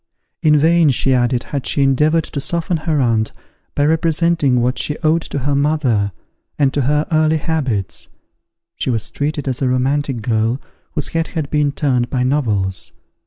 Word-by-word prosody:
In 155 -3 +4
vain, 165 +1 +4
she 135 0 +2
added, 120 -1 +1
had 140 -3 -4
she 140 - +1
endeavoured 150 +4 +3
to 140 - -5
soften 170 +3 -1
her 155 -1 -1
aunt, 115 -4 +1 0.4
by 145 - +2
representing 160 -4 +2
what 125 +2 0
she 150 - -1
owed 160 +2 +3
to 145 - -5
her 140 +1 -1
mother, 140 -8 +1 0.5
and 140 -2 +2
to 145 - 0
her 150 +3 +1
early 155 0 +3
habits; 130 - -2 0.7
she - - -2
was 115 -4 0
treated 145 0 -3
as 130 0 -2
a 130 - +2
romantic 130 -1 0
girl, 115 +2 0 0.3
whose 150 -3 -1
head 165 0 -1
had 155 -5 -4
been 150 -1 +2
turned 125 -4 0
by 125 -2 0
novels. 105 - -1
140 Hz, 170 wpm, -18 LUFS, 125-155 Hz, 0.7 s, In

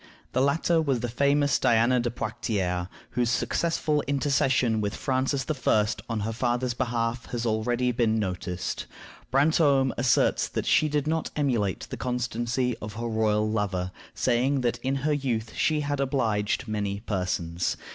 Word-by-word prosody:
The 130 - +1
latter 160 +4 +2
was 135 -6 0
the 120 - -1
famous 140 +4 +2
Diana 120 +2 +3
de 120 0 0
Poictiers, 105 -6 -2 0.2
whose 120 -1 0
successful 150 +5 0
intercession 135 -5 +2
with 100 0 -2
Francis 135 +1 0
I. 125 -8 +2 0.2
on 115 -2 -1
her 110 +2 -2
father's 120 +1 0
behalf 120 -1 -2
has 120 -1 -3
been 115 - +1
already 120 +3 0 0.2
noticed. 90 -5 -2 0.4
Brantome 140 -1 +3
asserts 125 0 +3
that - - -3
she 155 - +3
did 150 -1 0
not 160 +1 -1
emulate 120 - 0
the - - -7
constancy 125 0 -1
of 105 0 -6
her 115 +3 -5
royal 110 -2 +1
lover, 95 -4 -1 0.2
saying 130 +3 +1
that 120 -1 0
in 135 +1 -1
her 150 - +3
youth 120 -6 -2
she 155 -1 +1
had 145 -1 -2
"obliged 120 -4 0
many 100 -2 -2
persons." 90 -4 -2
120 Hz, 150 wpm, -27 LUFS, 110-135 Hz, 0.4 s, Diana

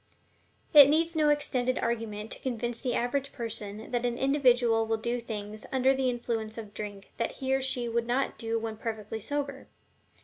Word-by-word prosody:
It 285 -2 +10
needs 330 +2 +2
no 305 -1 +4
extended 255 -4 +1
argument 220 -2 -2
to - - -3
convince 240 -2 -3
the 250 -2 -1
average 275 +3 -1
person 215 -2 -6
that 245 -1 0
an 240 -1 0
individual 245 -5 +3
will 225 0 +1
do 235 +2 -2
things 215 -2 -6
when - - -6
under 260 +1 +4
the 265 -1 +1
influence 230 -2 -3
of 210 -2 -8
drink 205 -2 -7
that 230 - -1
he 265 0 -2
or 270 - +2
she 255 -2 -1
would 235 0 -1
not 255 +3 0
do 230 -1 -1
when 225 -1 -4
perfectly 220 -1 -4
sober. 280 +3 -3
240 Hz, 190 wpm, -29 LUFS, 225-265 Hz, -, It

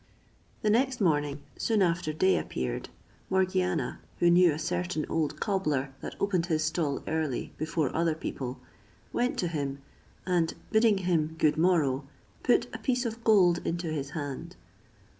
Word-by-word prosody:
The 210 - +3
next 255 +3 +2
morning, 145 -6 +1
soon 220 -3 +2
after 170 -2 0
day 185 +5 +3
appeared, 65 -2 -4 0.4
Morgiana, 185 -2 0 0.2
who 175 0 +4
knew 175 -1 +6
a 150 - -3
certain 175 0 -2
old 155 -2 -1
cobbler 150 -10 0
that - - -6
opened 185 -4 +1
his 155 -3 +1
stall 155 -2 -1
early, 155 -5 -2
before 155 -2 -1
other 165 -1 +2
people, 130 -4 -5 0.5
went 245 +1 0
to 180 - 0
him, 140 -4 -2 0.5
and 175 -3 +1 0.2
bidding 220 -2 +4
him 160 -3 +1
good 155 -2 +3
morrow, 155 -6 +2 0.4
put - - +3
a - - -5
piece 250 -1 0
of 230 0 -4
gold 185 -6 +5
into 170 -1 -2
his 140 -3 -3
hand. 145 -3 -5
165 Hz, 150 wpm, -29 LUFS, 150-185 Hz, 0.5 s, knew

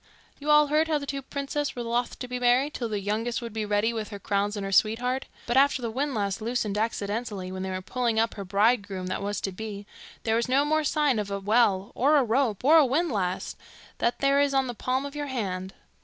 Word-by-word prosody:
'You 295 +1 -5
all 300 0 +7
heard 305 +2 +2
how 310 -1 +1
the 285 - -5
two 275 0 -4
princess 280 +1 -3
were 240 - -4
loth 235 +1 -1
to 250 - -6
be 250 0 -4
married 250 +4 +3
till 235 -2 -3
the 210 -2 -2
youngest 220 +4 -1
would 235 -3 -7
be 220 -1 -2
ready 210 +2 +1
with 220 -2 -4
her 205 - -6
crowns 205 +1 -1
and 200 - -3
her 195 - -4
sweetheart. 245 +6 +2 0.2
But 240 +2 0
after 275 -2 +4
the 230 - -2
windlass 220 -6 -1
loosened 225 -3 -1
accidentally 210 -2 -2
when 185 0 -5
they 190 - -3
were 185 0 -4
pulling 235 +1 0
up 225 0 +1
her 200 - -6
bridegroom 200 -1 +1
that 185 - -3
was 205 +1 -2
to 195 - -2
be, 205 +1 -7 0.4
there 220 -1 +1
was 235 +1 0
no 275 +3 +3
more 310 +1 +1
sign 295 -5 +2
of 205 -1 -3
a 200 0 -2
well, 200 -2 +2
or 285 +5 +3
a 280 - +4
rope, 235 -3 0
or 310 +5 +7
a - - +6
windlass, 245 - -1 0.4
than 235 - +2
there 275 0 +4
is 280 -1 +1
on 270 0 +3
the 245 - -4
palm 255 +4 -1
of 285 +1 -7
your 295 -1 -3
hand. 190 -8 -3
235 Hz, 240 wpm, -27 LUFS, 205-275 Hz, 0.4 s, all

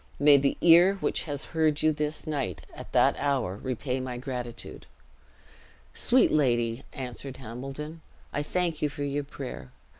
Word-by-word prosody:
may 145 0 +7
the 140 0 +2
ear 175 +3 +7
which 195 - -2
has 145 -2 -3
heard 155 -2 +2
you 155 - +5
this 150 +1 -2
night, 140 - -3
at - - -10
that - - +4
hour 130 -10 0
repay 130 +2 -3
my 130 -1 -4
gratitude!" 125 -2 -6 1.1
"Sweet 255 +1 +4
lady," 120 -4 +1
answered 130 +1 -6
Hambledon, 135 +6 -7 0.3
"I 145 - 0
thank 170 +1 -1
you 150 - +2
for 145 0 -5
your 145 +1 -1
prayer. 130 - -8
140 Hz, 150 wpm, -28 LUFS, 125-150 Hz, 1.1 s, may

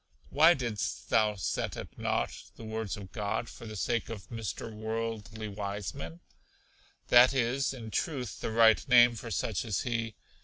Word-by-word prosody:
Why 160 +4 +6
didst 120 -7 -3
thou 105 -1 +3
set 95 - -2
at - - -8
nought - - -2
the - - -11
words 110 -2 -3
of 95 -3 -10
God, 105 +2 -2
for 115 - -10
the 110 - -7
sake 115 +2 -1
of 110 -4 -8
Mr. 115 0 -5
Worldly 110 0 -4
Wiseman? 100 -5 -5 0.9
That 125 +2 +7
is, 130 +2 +1
in 115 -5 -8
truth, 130 - -2
the - - -2
right 110 0 +5
name 120 -2 +7
for 115 +1 -7
such 110 -1 -1
as 105 -5 -1
he. 115 -2 -2
110 Hz, 160 wpm, -30 LUFS, 105-120 Hz, 0.9 s, That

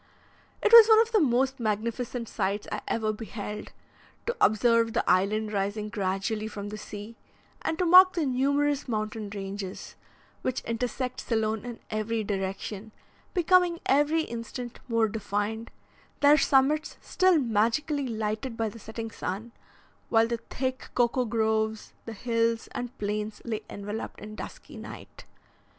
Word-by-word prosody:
It 435 - +3
was 460 -2 +12
one 440 0 +8
of 455 0 +3
the 440 - +4
most 265 -2 +2
magnificent 230 +2 -2
sights 200 +1 -2
I - - -3
ever 215 -1 0
beheld, 210 -1 -6 0.5
to 475 - -1
observe 230 +1 +4
the 235 - 0
island 210 +3 +2
rising 205 +2 -1
gradually 205 +2 -2
from 205 -1 -6
the 210 - -6
sea, 210 +2 -8 0.4
and 320 - -1
to 360 - +1
mark 370 +2 +8
the 335 -4 0
numerous 280 +2 +1
mountain 215 -2 -3
ranges, 195 -1 -6 0.5
which 255 0 -1
intersect 250 +2 -3
Ceylon 220 -1 -1
in 240 -2 -7
every 215 +1 -1
direction, 195 +1 -4 0.4
becoming 355 -1 +4
every 295 +4 +3
instant 235 -1 -6
more 230 -2 +2
defined, 215 +1 -3 0.5
their 290 +1 +7
summits 295 +2 +2
still 370 -2 +3
magically 265 +4 +1
lighted 220 +1 -3
by 225 -1 0
the 230 - -12
setting 225 +1 -6
sun, 220 +3 -5 0.6
while 225 0 +5
the 235 0 -1
thick 260 0 -3
cocoa 245 +1 +2
groves, 220 -1 0
the 230 - -6
hills, 230 0 0
and 245 +2 -5
plains 210 +1 -3
lay 225 -3 -2
enveloped 205 +2 -6
in 210 0 -9
dusky 215 - -9
night. - - -10
230 Hz, 140 wpm, -28 LUFS, 215-260 Hz, 0.6 s, was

